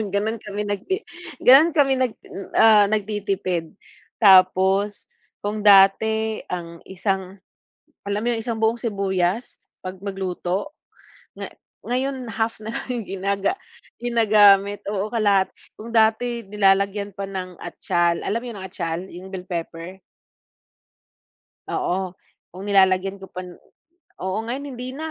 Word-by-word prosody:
gano'n 215 +2 -1
kami 210 0 -5
nagti 205 - -3 0.4
gano'n 285 +7 +8
kami 275 -3 +4
nag, 250 -3 +1 0.4
ah, 215 -2 +6
nagtitipid. 200 -5 -2 0.5
Tapos 190 0 +4 0.4
kung 210 +1 -2
dati 215 +2 +5
ang 170 -2 -6
isang 190 0 -3 0.7
alam 200 +1 -1
mo 240 - -1
'yong 225 - -3
isang 230 -1 -3
buong 220 +1 +2
sibuyas, 195 -1 -1 0.2
'pag 185 0 -7
magluto? 195 +5 -3 0.6
Nga - - -6 0.4
ngayon 260 +1 -2
half 225 0 -2
na 215 - -8
lang 250 -2 -3
ginaga 195 - -1 0.4
ginagamit, 205 -4 +4
oo 205 +1 -2
kalahati. 205 -4 +2 0.3
Kung 220 +2 -9
dati 230 +2 +2
nilalagyan 200 0 +1
pa 200 - -4
ng 185 -2 -6
atyal, 175 -1 0
alam 230 - -2
mo - - -7
'yung 205 - -9
atyal? 170 -3 -4
'Yung 185 +2 -11
bell 185 -1 -7
pepper. 170 +1 -6 1.7
Oo, 185 0 -2 0.4
kung 185 - -9
nilalagyan 190 -1 +3
ko 190 -1 -11
pa 185 - -5 0.8
oo 190 +2 -2
ngayon 265 +5 -4
hindi 250 +1 -6
na. 315 +4 -5
200 Hz, 125 wpm, -22 LUFS, 190-220 Hz, 1.7 s, gano'n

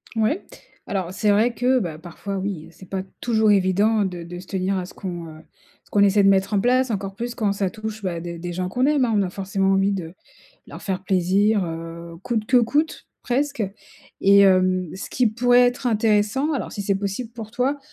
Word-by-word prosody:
Oui. 220 -1 +2 0.6
Alors, 190 -3 -2
c'est 210 +2 +2
vrai 220 +4 +3
que, 255 +2 +2
bah, 170 -8 -4
parfois 175 +4 -6
oui, 190 -4 -4
c'est 180 +3 -15
pas 190 -1 -2 0.2
toujours 220 -2 +2
évident 200 +2 +3
de 180 -2 -5
de 175 +1 -8
se 185 - -11
tenir 190 0 -1
à 185 - -3
ce 180 - -12
qu'on, 175 -3 -6
heu 155 0 -11 0.4
ce - - -28
qu'on 205 - +3
essaie 200 0 +4
de 195 - +6
mettre 195 +1 +2
en 205 - +3
place 255 +3 +2
encore 195 -2 -3
plus 235 +3 -4
quand 215 -4 0
ça 195 -1 -1
touche 220 0 -6
bah 175 -3 -2
des 170 0 -6
des 175 +1 -5
gens 180 +1 -2
qu'on 250 +7 +1
aime 295 -3 +3
hein, 235 - -1
on 205 - +3
a 185 - -2
forcément 195 0 0
envie 195 +1 +2
de 170 -4 -5 0.5
leur - - -10
faire 190 -2 -3
plaisir 195 +3 +2
heu 165 +1 -7
coûte 230 -2 -1
que 255 - +3
coûte 290 +7 0 0.2
presque 280 0 -1 0.6
et 200 +1 +7
hem, 185 -2 +4
ce 190 - -7
qui 250 - +2
pourrait 245 +3 +4
être 245 +1 -2
intéressant 220 +5 +2
alors 280 - -3
si 205 - -5
c'est 200 0 +1
possible 200 +4 -3
pour 225 -2 -8
toi, 255 +5 0
200 Hz, 220 wpm, -23 LUFS, 185-225 Hz, 0.6 s, et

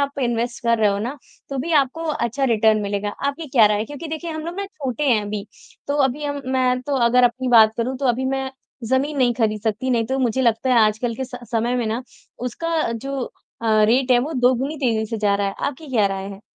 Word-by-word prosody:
आप 280 0 -2
इन्वेस्ट 235 +1 -1
कर 235 -1 +2
रहे 215 - +4
हो 200 - -1
ना, 240 +7 -4 0.3
तो 275 - -3
भी 325 +6 -2
आपको 295 +2 +2
अच्छा 270 -3 -1
रिटर्न 220 -3 +3
मिलेगा, 200 0 -2 0.2
आपकी 300 +3 -3
क्या 240 -5 +6
राय 210 0 +1
है? 215 - -1
क्योंकि 290 +6 -8
देखिए, 320 +2 -4
हम 315 -1 -5
लोग 340 +1 -5
ना 400 - -3
छोटे 295 - -4
हैं 230 -4 +4
अभी, 205 0 -5 0.4
तो 285 - 0
अभी 270 +3 -2
हम 285 0 -3
मैं 255 -1 +2
तो 280 +1 -1
अगर 250 +1 +4
अपनी 250 +2 +1
बात 220 -3 +7
करूँ, 250 +3 -1
तो 275 - -1
अभी 245 +2 +1
मैं 265 0 -3 0.3
ज़मीन 260 +5 0
नहीं 245 -2 +3
खरीद 215 -2 0
सकती, 225 +4 -1
नहीं 235 -2 +2
तो 265 +2 -1
मुझे 260 0 +1
लगता 235 +2 +1
है, 245 - +5
आजकल 220 +3 0
के 265 - -4
स 250 0 -8 0.2
समय 235 +2 +1
में 240 -2 -1
ना, 225 +3 -2 0.4
उसका 315 +4 -2
जो 270 +3 -4 0.4
अ, 215 -1 +3
रेट 250 +4 +2
है, 245 - +6
वो 280 +6 -2
दोगुनी 260 +2 +1
तेज़ी 225 -5 0
से 225 - -4
जा 205 -1 +2
रहा 200 0 0
है, 195 - -5
आपकी 290 +3 -5
क्या 220 -5 +3
राय 195 0 -3
है? 195 0 -10
250 Hz, 245 wpm, -21 LUFS, 220-275 Hz, 0.4 s, बात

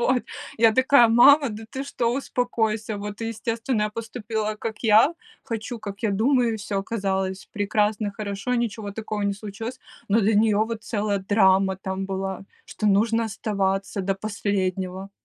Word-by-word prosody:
Вот. 250 +1 +2 0.4
Я 225 -1 +6
такая: 260 0 +6
"Мама, 275 +4 +6
да 215 +1 -7
ты 270 0 -4
что? 240 -4 -1
Успокойся!". 225 -5 -1
Вот 205 +1 -6
и, 225 - -2
естественно, 230 +1 -2
я 210 - 0
поступила, 220 -1 -4
как 220 0 -5
я 225 +7 +5 0.3
хочу, 230 -1 -5
как 200 -1 -8
я 220 - +1
думаю, 235 +2 +2
и - - -3
всё 200 -1 -3
оказалось 195 -2 -2
прекрасно, 210 0 0
хорошо, 200 +4 -3
ничего 220 -3 -2
такого 215 0 -5
не 200 0 0
случилось, 225 +5 -7 0.3
но 215 +3 +4
для 215 +1 +2
нее 210 0 +4
вот 225 0 -5
целая 205 -3 -1
драма 190 -1 +3
там 190 0 -4
была, 190 -1 -3 0.2
что 215 - -4
нужно 225 +3 +3
оставаться 200 -2 -2
до 195 +1 0
последнего. 195 -2 -2
215 Hz, 160 wpm, -24 LUFS, 200-230 Hz, 0.4 s, Я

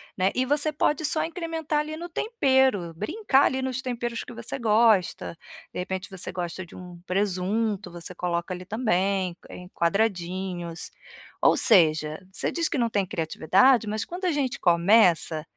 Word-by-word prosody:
né. 190 +1 +1
E 255 - +1
você 290 +3 +1
pode 300 +1 0
só 310 +1 +4
incrementar 325 -3 -3
ali 305 +1 -4
no 345 +2 -6
tempero, 265 - +1
brincar 280 - +2
ali 265 0 0
nos 260 0 -3
temperos 240 -2 -4
que - - -11
você 235 +3 -5
gosta. 215 -7 +2 0.4
De - - -5
repente 190 +1 -4
você 190 -2 -4
gosta 180 0 -5
de 170 - -15
um 180 -1 -11
presunto, 195 +1 -1
você 175 +1 -6
coloca 175 0 -3
ali 180 0 -8
também, 195 -4 0
em 180 0 -10
quadradinhos. 180 -2 -2 0.5
Ou - - +4
seja, 155 -3 +4
você - - -1
diz 335 -1 -1
que 330 - -2
não 235 -2 +1
tem 205 -3 0
criatividade, 190 - +2
mas 215 0 -2
quando 360 +2 -6
a 360 - +2
gente 275 -2 -2
começa, 170 -3 +3
205 Hz, 160 wpm, -25 LUFS, 180-265 Hz, 0.5 s, só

